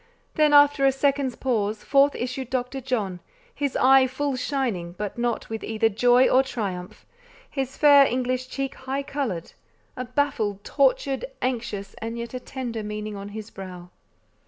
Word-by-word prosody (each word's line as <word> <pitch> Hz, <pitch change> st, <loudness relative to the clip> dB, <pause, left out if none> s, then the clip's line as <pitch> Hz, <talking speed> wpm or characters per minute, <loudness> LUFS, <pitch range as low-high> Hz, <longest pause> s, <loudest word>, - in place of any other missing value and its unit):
Then, 305 Hz, -1 st, +3 dB
after 290 Hz, -1 st, +6 dB
a 270 Hz, -, +6 dB
second's 275 Hz, -1 st, 0 dB
pause, 220 Hz, -4 st, -1 dB
forth 280 Hz, 0 st, +4 dB
issued 255 Hz, 0 st, -4 dB
Dr. 255 Hz, +1 st, -2 dB
John, 215 Hz, -8 st, -2 dB, 0.3 s
his 285 Hz, -, -2 dB
eye 265 Hz, 0 st, +6 dB
full 275 Hz, +2 st, -2 dB
shining, 245 Hz, -11 st, -2 dB
but 205 Hz, +2 st, -5 dB
not 240 Hz, -1 st, -2 dB
with 225 Hz, 0 st, -5 dB
either 220 Hz, 0 st, +1 dB
joy 245 Hz, +4 st, +4 dB
or 260 Hz, -, +5 dB
triumph; 195 Hz, -9 st, -5 dB, 0.5 s
his 270 Hz, -1 st, -3 dB
fair 285 Hz, -2 st, +7 dB
English 255 Hz, +1 st, -1 dB
cheek 270 Hz, +1 st, -3 dB
high 270 Hz, +2 st, -4 dB
coloured; 270 Hz, -, -3 dB, 0.4 s
a 255 Hz, -, -4 dB
baffled, 240 Hz, -7 st, -1 dB
tortured, 275 Hz, -, +1 dB
anxious, 225 Hz, -6 st, -3 dB
and 230 Hz, +1 st, -5 dB
yet 235 Hz, +1 st, -6 dB
a 255 Hz, -, -3 dB
tender 245 Hz, -3 st, -5 dB
meaning 210 Hz, 0 st, -5 dB
on 200 Hz, 0 st, -7 dB
his 215 Hz, +1 st, -8 dB
brow. 180 Hz, -2 st, -9 dB
250 Hz, 160 wpm, -25 LUFS, 215-270 Hz, 0.5 s, fair